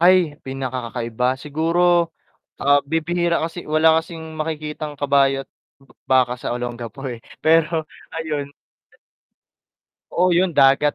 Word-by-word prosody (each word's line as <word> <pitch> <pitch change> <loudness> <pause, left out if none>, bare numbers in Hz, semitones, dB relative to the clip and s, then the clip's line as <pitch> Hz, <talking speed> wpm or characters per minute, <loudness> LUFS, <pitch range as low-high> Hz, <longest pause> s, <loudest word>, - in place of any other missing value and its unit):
Ay, 175 -4 +4
pinakakakaiba. 125 -1 -2
Siguro 165 +3 +2 0.5
ah, 145 +1 +5
bibihira 170 +2 0
kasi 165 +1 -5
wala 160 +1 +4
kasing 165 0 -9 0.2
makikitang 155 -1 -4
kabayo't 135 -1 +2 0.6
baka 130 -2 +4
sa 120 - -3
Olongapo 120 +2 -6
eh, 115 - -7 0.2
pero 160 0 +3 0.3
ayun. 150 -3 -3 1.7
Oo 180 +1 +3
yun. 175 -1 +2
Dagat 135 +2 +5
150 Hz, 105 wpm, -21 LUFS, 135-165 Hz, 1.7 s, ah